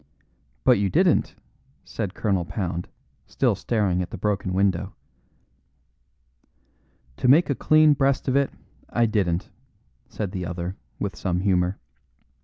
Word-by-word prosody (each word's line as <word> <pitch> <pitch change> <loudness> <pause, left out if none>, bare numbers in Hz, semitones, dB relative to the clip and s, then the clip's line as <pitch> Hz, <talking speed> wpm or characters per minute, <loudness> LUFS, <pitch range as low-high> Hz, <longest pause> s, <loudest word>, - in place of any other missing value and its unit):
"But - - +5
you 100 -1 +1
didn't," - - +2 0.5
said 105 -3 -4
Colonel 95 -5 0
Pound, 85 -1 -4 0.4
still - - +1
staring 100 -6 0
at 90 - -4
the - - -7
broken 100 -1 -1
window. 95 0 0 2.2
"To - - 0
make 145 +4 +5
a - - +3
clean 155 +2 +5
breast 135 -1 +1
of 130 - +1
it, 140 -1 +3 0.4
I 120 0 +2
didn't," 95 -5 -1 0.6
said 100 -4 -4
the 95 -3 -4
other, 90 +1 -4 0.2
with 100 -4 -3
some 90 0 -1
humour. 90 -1 +1
100 Hz, 130 wpm, -24 LUFS, 90-115 Hz, 2.2 s, But